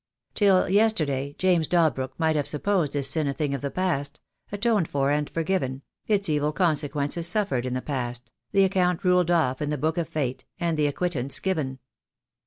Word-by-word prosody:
Till 195 Hz, -3 st, +3 dB
yesterday 155 Hz, -10 st, +1 dB
James 175 Hz, -4 st, +2 dB
Dalbrook 155 Hz, -7 st, +1 dB
might 160 Hz, -1 st, +1 dB
have 145 Hz, -2 st, +1 dB
supposed 165 Hz, -1 st, 0 dB
his 140 Hz, -2 st, +1 dB
sin 150 Hz, +1 st, +1 dB
a 140 Hz, -, -1 dB
thing 145 Hz, -1 st, -2 dB
of 140 Hz, -, -3 dB
the 140 Hz, -, -2 dB
past, 150 Hz, -5 st, -2 dB, 0.3 s
atoned 205 Hz, -4 st, +1 dB
for 140 Hz, 0 st, 0 dB
and 150 Hz, 0 st, 0 dB
forgiven 155 Hz, -6 st, -2 dB
— -, -, -49 dB
its 205 Hz, -2 st, +2 dB
evil 150 Hz, -1 st, +1 dB
consequences 150 Hz, -1 st, 0 dB
suffered 170 Hz, -, 0 dB
in 125 Hz, -, -2 dB
the 130 Hz, -, -3 dB
past, 125 Hz, -4 st, -4 dB, 0.2 s
the 195 Hz, -, +4 dB
account 180 Hz, -1 st, +1 dB
ruled 180 Hz, -2 st, +3 dB
off 155 Hz, -7 st, +1 dB
in 150 Hz, -, -1 dB
the 150 Hz, -, -1 dB
book 160 Hz, +4 st, -1 dB
of 165 Hz, -2 st, -3 dB
fate, 140 Hz, -6 st, -3 dB, 0.2 s
and 170 Hz, -2 st, 0 dB
the 150 Hz, -1 st, +2 dB
acquittance 145 Hz, -3 st, -2 dB
given. 155 Hz, -9 st, -2 dB
155 Hz, 190 wpm, -25 LUFS, 140-180 Hz, 0.3 s, the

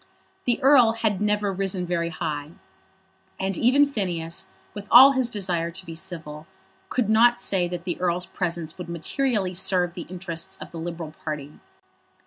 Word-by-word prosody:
The 240 Hz, -2 st, +1 dB
Earl 255 Hz, -5 st, +6 dB
had 220 Hz, -4 st, -1 dB
never 210 Hz, -1 st, +1 dB
risen 190 Hz, -1 st, -2 dB
very 170 Hz, -1 st, -1 dB
high, 155 Hz, -2 st, -4 dB, 0.9 s
and 190 Hz, 0 st, -1 dB
even 265 Hz, +8 st, +4 dB
Phineas, 175 Hz, -11 st, -3 dB, 0.3 s
with 205 Hz, -1 st, -8 dB
all 265 Hz, +3 st, +10 dB
his 260 Hz, -3 st, +1 dB
desire 180 Hz, -6 st, -1 dB
to 185 Hz, +2 st, -8 dB
be 165 Hz, -, -7 dB
civil, 160 Hz, -3 st, -7 dB, 0.4 s
could 250 Hz, -5 st, 0 dB
not 235 Hz, +3 st, +5 dB
say 185 Hz, -3 st, 0 dB
that 175 Hz, -1 st, -5 dB
the 175 Hz, -1 st, -4 dB
Earl's 180 Hz, 0 st, 0 dB
presence 170 Hz, -2 st, -4 dB
would 175 Hz, -1 st, -7 dB
materially 190 Hz, -, -1 dB
serve 180 Hz, -1 st, +1 dB
the 175 Hz, -2 st, -8 dB
interests 175 Hz, -3 st, -6 dB
of -, -, -9 dB
the 165 Hz, -, -7 dB
Liberal 165 Hz, -2 st, -6 dB
party. 150 Hz, -2 st, -6 dB
180 Hz, 160 wpm, -24 LUFS, 170-210 Hz, 0.9 s, all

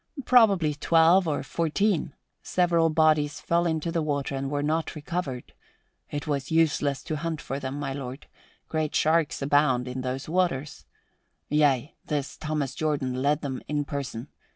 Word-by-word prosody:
Probably 200 Hz, -11 st, +5 dB
twelve 165 Hz, +4 st, +4 dB
or 145 Hz, -3 st, -1 dB
fourteen. 165 Hz, +1 st, 0 dB, 0.3 s
Several 170 Hz, -2 st, +2 dB
bodies 155 Hz, -1 st, +2 dB
fell 170 Hz, +1 st, +1 dB
into 160 Hz, 0 st, -1 dB
the 165 Hz, -, 0 dB
water 145 Hz, -2 st, -2 dB
and 135 Hz, 0 st, -2 dB
were 145 Hz, 0 st, -1 dB
not 160 Hz, +3 st, -1 dB
recovered. 150 Hz, -5 st, -4 dB, 0.6 s
It 145 Hz, 0 st, -4 dB
was 140 Hz, -3 st, -2 dB
useless 150 Hz, -4 st, +1 dB
to 155 Hz, -, -3 dB
hunt 165 Hz, 0 st, -3 dB
for 135 Hz, -1 st, -4 dB
them, 130 Hz, 0 st, -4 dB
my 140 Hz, -2 st, -3 dB
lord. 135 Hz, 0 st, -7 dB, 0.4 s
Great 155 Hz, -1 st, -2 dB
sharks 155 Hz, -2 st, +2 dB
abound 135 Hz, -3 st, +2 dB
in 125 Hz, +1 st, -4 dB
those 130 Hz, +2 st, -4 dB
waters. 155 Hz, -5 st, -1 dB, 0.6 s
Yea, 145 Hz, -2 st, +2 dB
this 145 Hz, -3 st, -2 dB
Thomas 150 Hz, -3 st, -3 dB
Jordan 145 Hz, -5 st, -1 dB
led 145 Hz, +2 st, +2 dB
them 130 Hz, -3 st, -4 dB
in 145 Hz, 0 st, -1 dB
person. 140 Hz, -3 st, -5 dB
150 Hz, 155 wpm, -26 LUFS, 140-165 Hz, 0.6 s, Probably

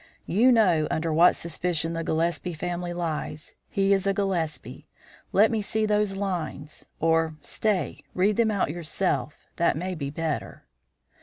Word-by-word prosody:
"You 230 Hz, +8 st, +4 dB
know 180 Hz, -10 st, +4 dB
under 160 Hz, 0 st, -1 dB
what 170 Hz, +3 st, +6 dB
suspicion 165 Hz, -1 st, -2 dB
the 165 Hz, 0 st, -2 dB
Gillespie 165 Hz, +1 st, -1 dB
family 175 Hz, +2 st, -3 dB
lies. 160 Hz, -3 st, -4 dB, 0.2 s
He 195 Hz, 0 st, +2 dB
is 195 Hz, 0 st, +1 dB
a 195 Hz, -, +2 dB
Gillespie; 180 Hz, -6 st, -2 dB, 0.4 s
let 215 Hz, +4 st, +5 dB
me 220 Hz, -2 st, 0 dB
see 215 Hz, +1 st, 0 dB
those 210 Hz, -2 st, +1 dB
lines 175 Hz, -6 st, -4 dB
or, 160 Hz, 0 st, +2 dB
stay, 210 Hz, -4 st, -1 dB
read 200 Hz, +3 st, +3 dB
them 230 Hz, 0 st, +3 dB
out 200 Hz, -8 st, 0 dB
yourself 155 Hz, -4 st, -2 dB
that 170 Hz, -3 st, +2 dB
may 185 Hz, +3 st, -3 dB
be 140 Hz, -5 st, -4 dB
better." 145 Hz, -, -4 dB
175 Hz, 150 wpm, -26 LUFS, 160-195 Hz, 0.4 s, what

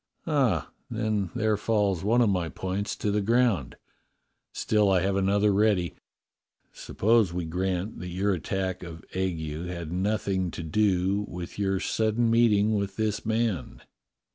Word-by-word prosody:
"Ah, 130 Hz, -, +1 dB, 0.2 s
then 110 Hz, -4 st, -1 dB
there 110 Hz, -2 st, +2 dB
falls 105 Hz, -4 st, 0 dB
one 115 Hz, +4 st, +3 dB
of 115 Hz, -, +4 dB
my 90 Hz, -4 st, -1 dB
points 95 Hz, +4 st, -3 dB
to 105 Hz, -, -1 dB
the 105 Hz, +1 st, +1 dB
ground. 110 Hz, -, +1 dB, 0.8 s
Still 105 Hz, -2 st, +2 dB
I 95 Hz, -2 st, +3 dB
have 95 Hz, +1 st, 0 dB
another 100 Hz, +1 st, +2 dB
ready. 100 Hz, -4 st, +2 dB, 0.8 s
Suppose 110 Hz, -3 st, +2 dB
we 90 Hz, -1 st, -2 dB
grant 90 Hz, +4 st, -2 dB
that 90 Hz, -, -6 dB
your 95 Hz, +3 st, 0 dB
attack 95 Hz, +1 st, -2 dB
of 85 Hz, -2 st, -9 dB
ague 85 Hz, -3 st, -2 dB
had 85 Hz, -3 st, -5 dB
nothing 95 Hz, 0 st, 0 dB
to 85 Hz, -, -4 dB
do 95 Hz, +3 st, +1 dB
with 90 Hz, +2 st, -7 dB
your 95 Hz, -1 st, +1 dB
sudden 110 Hz, +3 st, +1 dB
meeting 110 Hz, -2 st, +4 dB
with 100 Hz, -2 st, -1 dB
this 105 Hz, 0 st, -2 dB
man." 110 Hz, -, -1 dB
100 Hz, 145 wpm, -27 LUFS, 90-110 Hz, 0.8 s, of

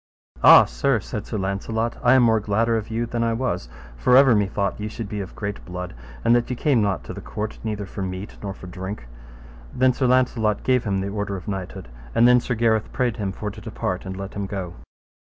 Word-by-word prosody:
Ah, -, -, +10 dB
sir, -, -, 0 dB
said -, -, -6 dB
Sir -, -, -3 dB
Launcelot, 110 Hz, +4 st, -2 dB
I 125 Hz, +1 st, +5 dB
am 130 Hz, -, +6 dB
more 110 Hz, -1 st, +4 dB
gladder 110 Hz, +3 st, +1 dB
of 110 Hz, 0 st, -3 dB
you 115 Hz, +1 st, -1 dB
than 120 Hz, 0 st, -2 dB
I 115 Hz, 0 st, +1 dB
was; 115 Hz, -, -2 dB, 0.3 s
for 125 Hz, -, +4 dB
ever 135 Hz, -2 st, +7 dB
me 105 Hz, -2 st, +2 dB
thought 100 Hz, 0 st, -2 dB
ye 105 Hz, -, -3 dB
should 110 Hz, 0 st, -6 dB
be 105 Hz, 0 st, -4 dB
of 95 Hz, -, -8 dB
great 100 Hz, -1 st, -5 dB
blood, 90 Hz, 0 st, -6 dB, 0.3 s
and 120 Hz, -, +5 dB
that 120 Hz, -1 st, +1 dB
ye 125 Hz, -, -1 dB
came 130 Hz, -2 st, +2 dB
not 100 Hz, -3 st, 0 dB
to -, -, -7 dB
the -, -, -8 dB
court 105 Hz, +1 st, -5 dB
neither 105 Hz, -2 st, -3 dB
for 100 Hz, -, -7 dB
meat 95 Hz, +2 st, -5 dB
nor 100 Hz, -1 st, -5 dB
for -, -, -12 dB
drink. 95 Hz, -, -7 dB, 0.7 s
And -, -, -9 dB
then 130 Hz, 0 st, +5 dB
Sir 130 Hz, +1 st, 0 dB
Launcelot 125 Hz, -4 st, +2 dB
gave 125 Hz, -2 st, +2 dB
him 100 Hz, -2 st, 0 dB
the 100 Hz, -, -3 dB
order 100 Hz, -1 st, -3 dB
of 95 Hz, -, -8 dB
knighthood, 95 Hz, -9 st, -5 dB, 0.3 s
and 120 Hz, -, +6 dB
then 125 Hz, 0 st, +6 dB
Sir 125 Hz, -, -2 dB
Gareth 110 Hz, -1 st, +1 dB
prayed 125 Hz, -3 st, 0 dB
him 100 Hz, -3 st, -2 dB
for 105 Hz, +2 st, -5 dB
to 105 Hz, +1 st, -11 dB
depart 100 Hz, -4 st, -3 dB
and 95 Hz, 0 st, -5 dB
let 95 Hz, 0 st, -6 dB
him 100 Hz, -1 st, -3 dB
go. 95 Hz, -3 st, -5 dB
105 Hz, 240 wpm, -23 LUFS, 95-115 Hz, 0.7 s, Ah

